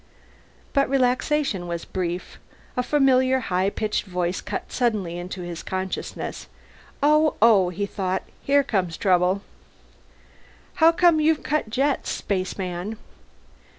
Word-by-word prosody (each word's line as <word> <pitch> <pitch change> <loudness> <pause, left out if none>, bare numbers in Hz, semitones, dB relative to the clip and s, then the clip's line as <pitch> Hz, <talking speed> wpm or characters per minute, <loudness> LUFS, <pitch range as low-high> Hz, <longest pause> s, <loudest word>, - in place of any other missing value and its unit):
But 275 -3 +2
relaxation 255 -5 +1
was 170 -1 -4
brief. 180 -1 -4 0.4
A 250 - +1
familiar 260 -1 +3
high 190 -4 0
pitched 210 +1 -2
voice 180 -1 -2
cut 210 - -5
suddenly 210 -9 0
into 180 +1 -6
his 175 -1 -6
consciousness. 190 0 -4 0.6
Oh, 305 +1 +4
oh, 205 -5 +5
he 200 +3 -3
thought. 190 -2 -2 0.2
Here 285 +1 +3
comes 185 - -1
trouble. 185 +1 +2 1.4
"How 325 +1 +8
come 335 -1 +4
you've 310 0 +2
cut 300 -6 -1
jets, 270 +5 0
spaceman?" 185 +1 -3
205 Hz, 120 wpm, -24 LUFS, 185-270 Hz, 1.4 s, How